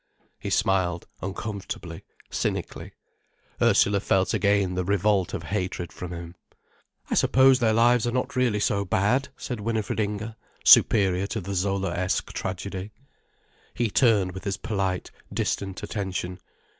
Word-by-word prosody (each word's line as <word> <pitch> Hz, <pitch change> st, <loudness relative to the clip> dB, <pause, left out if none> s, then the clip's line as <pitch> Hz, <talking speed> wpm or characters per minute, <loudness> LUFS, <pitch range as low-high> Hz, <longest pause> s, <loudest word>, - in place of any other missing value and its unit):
He -, -, -5 dB
smiled, 90 Hz, -3 st, +1 dB, 0.2 s
uncomfortably, 95 Hz, -3 st, -6 dB, 0.3 s
cynically. -, -, -3 dB, 0.7 s
Ursula 100 Hz, 0 st, +4 dB
felt 95 Hz, 0 st, +1 dB
again 100 Hz, -3 st, +2 dB
the 90 Hz, 0 st, -1 dB
revolt 100 Hz, 0 st, +1 dB
of -, -, -5 dB
hatred 90 Hz, -3 st, -3 dB
from 90 Hz, -1 st, -7 dB
him. 85 Hz, -1 st, -7 dB, 0.8 s
"I -, -, +2 dB
suppose 130 Hz, 0 st, +5 dB
their 115 Hz, -3 st, +3 dB
lives 120 Hz, +1 st, +4 dB
are -, -, 0 dB
not 125 Hz, +2 st, -2 dB
really 125 Hz, -5 st, +2 dB
so 100 Hz, -1 st, +1 dB
bad," 105 Hz, +8 st, +1 dB
said 125 Hz, -3 st, -5 dB
Winifred 110 Hz, 0 st, -2 dB
Inger, 105 Hz, +1 st, -2 dB, 0.3 s
superior 95 Hz, -1 st, +6 dB
to 110 Hz, -, -3 dB
the 100 Hz, +1 st, -5 dB
Zolaesque 95 Hz, -1 st, -1 dB
tragedy. 95 Hz, +1 st, -4 dB, 0.9 s
He 115 Hz, -3 st, 0 dB
turned 105 Hz, -8 st, +3 dB
with 95 Hz, +1 st, -8 dB
his 100 Hz, -1 st, -2 dB
polite, 95 Hz, -4 st, -2 dB, 0.2 s
distant 95 Hz, -1 st, -2 dB
attention. 95 Hz, -3 st, -4 dB
100 Hz, 130 wpm, -25 LUFS, 95-110 Hz, 0.9 s, superior